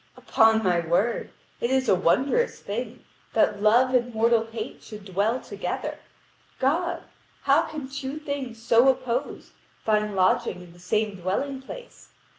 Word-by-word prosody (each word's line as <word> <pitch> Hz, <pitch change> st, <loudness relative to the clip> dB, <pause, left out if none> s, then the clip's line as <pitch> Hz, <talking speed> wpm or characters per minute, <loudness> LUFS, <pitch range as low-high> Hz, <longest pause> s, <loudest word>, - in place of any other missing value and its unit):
Upon 220 Hz, 0 st, +3 dB
my 180 Hz, -3 st, +2 dB
word, 175 Hz, +8 st, 0 dB, 0.3 s
it 235 Hz, -, -1 dB
is 265 Hz, -1 st, +1 dB
a -, -, +5 dB
wondrous 265 Hz, -, +2 dB
thing, 230 Hz, +3 st, -6 dB, 0.3 s
that 210 Hz, -2 st, +2 dB
Love 240 Hz, +5 st, +4 dB
and 245 Hz, -1 st, +2 dB
mortal 225 Hz, 0 st, +3 dB
Hate 225 Hz, +1 st, -7 dB
should 210 Hz, -3 st, -11 dB
dwell 205 Hz, +6 st, 0 dB
together. -, -, -5 dB, 0.6 s
God! 340 Hz, +6 st, 0 dB, 0.4 s
How -, -, +5 dB
can 305 Hz, -4 st, -6 dB
two 275 Hz, +1 st, -5 dB
things 280 Hz, -6 st, -5 dB
so 235 Hz, +3 st, +5 dB
opposed 255 Hz, 0 st, -2 dB, 0.3 s
find 210 Hz, -1 st, +1 dB
lodging 185 Hz, -1 st, +1 dB
in 170 Hz, -1 st, -15 dB
the 175 Hz, -, -18 dB
same 205 Hz, +3 st, -1 dB
dwelling 260 Hz, +10 st, -2 dB
place? -, -, -11 dB
230 Hz, 145 wpm, -25 LUFS, 210-265 Hz, 0.6 s, a